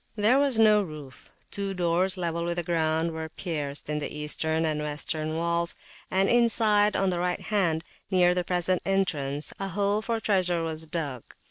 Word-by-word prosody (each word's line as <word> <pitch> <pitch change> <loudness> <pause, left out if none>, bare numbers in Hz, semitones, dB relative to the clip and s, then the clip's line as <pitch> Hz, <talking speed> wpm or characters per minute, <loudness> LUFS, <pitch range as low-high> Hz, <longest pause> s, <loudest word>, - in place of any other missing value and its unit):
There 225 +5 +4
was 280 -4 +2
no 215 -1 +6
roof; 150 -7 -9 0.2
two 195 -1 -3
doors, 180 +2 +2
level 170 -1 -2
with 170 0 -1
the 175 - -1
ground, 160 0 0
were 160 0 -5
pierced 150 -5 -4
in 150 0 -1
the 145 - -3
Eastern 160 +2 -2
and 155 -1 -1
Western 155 +1 -3
walls; 170 +1 -1 0.3
and 190 +1 +2
inside, 220 -3 +3
on 195 -1 +2
the 175 - -1
right 180 0 0
hand, 180 -7 0 0.3
near 180 -2 +4
the 180 0 0
present 180 0 0
entrance, 155 -7 0
a 195 - -2
hole 200 +3 0
for 230 0 -1
treasure 180 -5 +1
was 160 0 -3
dug. 145 -7 -3
175 Hz, 175 wpm, -27 LUFS, 160-195 Hz, 0.3 s, no